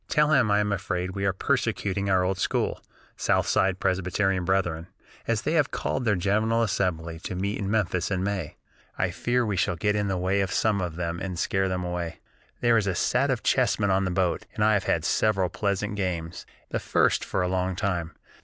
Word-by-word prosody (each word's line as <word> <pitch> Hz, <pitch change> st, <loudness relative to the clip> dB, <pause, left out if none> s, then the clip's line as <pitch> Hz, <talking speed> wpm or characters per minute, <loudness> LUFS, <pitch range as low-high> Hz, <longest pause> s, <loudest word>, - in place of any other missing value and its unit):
Tell 150 Hz, 0 st, +3 dB
him 130 Hz, -7 st, +4 dB
I 105 Hz, 0 st, +3 dB
am 105 Hz, 0 st, -1 dB
afraid 90 Hz, -1 st, -2 dB
we 100 Hz, +1 st, -3 dB
are -, -, +3 dB
persecuting 100 Hz, +1 st, -1 dB
our 95 Hz, -1 st, +3 dB
old 95 Hz, 0 st, -1 dB
school, -, -, -1 dB, 0.3 s
southside 95 Hz, -1 st, +1 dB
Presbyterian 95 Hz, 0 st, 0 dB
brethren, 85 Hz, -3 st, 0 dB, 0.4 s
as 110 Hz, -3 st, 0 dB
they 155 Hz, -, 0 dB
have 155 Hz, -4 st, +3 dB
called 125 Hz, -, -2 dB
their 105 Hz, -2 st, +3 dB
General 110 Hz, +5 st, +1 dB
Assembly 85 Hz, -6 st, -1 dB
to 90 Hz, -, -5 dB
meet 100 Hz, +3 st, -2 dB
in 100 Hz, -2 st, -2 dB
Memphis 95 Hz, -5 st, 0 dB
in 95 Hz, -2 st, -1 dB
May. 95 Hz, -6 st, -3 dB, 0.4 s
I 90 Hz, -1 st, 0 dB
fear 120 Hz, +6 st, 0 dB
we 105 Hz, -3 st, -1 dB
shall 90 Hz, -, +1 dB
get 105 Hz, +5 st, 0 dB
in 105 Hz, -1 st, 0 dB
the 95 Hz, -1 st, -1 dB
way 95 Hz, +2 st, +1 dB
of 95 Hz, -1 st, -1 dB
some 105 Hz, -3 st, +1 dB
of 85 Hz, -3 st, -3 dB
them, 85 Hz, 0 st, -3 dB
and 95 Hz, -3 st, -4 dB
scare 95 Hz, +2 st, 0 dB
them 90 Hz, -1 st, -2 dB
away. 90 Hz, -1 st, -4 dB, 0.4 s
"There 120 Hz, -1 st, +4 dB
is 105 Hz, -2 st, +1 dB
a 95 Hz, -, 0 dB
set 130 Hz, +9 st, +1 dB
of 125 Hz, -3 st, -1 dB
chessmen 110 Hz, -6 st, +2 dB
on 95 Hz, 0 st, +2 dB
the -, -, -1 dB
boat, 90 Hz, -1 st, 0 dB
and 105 Hz, -, 0 dB
I 110 Hz, 0 st, +5 dB
have 100 Hz, -3 st, +1 dB
had 80 Hz, 0 st, +1 dB
several 95 Hz, -4 st, +2 dB
pleasant 105 Hz, +2 st, -1 dB
games, 85 Hz, -4 st, -3 dB, 0.2 s
the -, -, -1 dB
first -, -, +2 dB
for 95 Hz, -, -1 dB
a -, -, 0 dB
long 90 Hz, 0 st, -1 dB
time. 90 Hz, -4 st, -2 dB
95 Hz, 210 wpm, -26 LUFS, 90-105 Hz, 0.4 s, I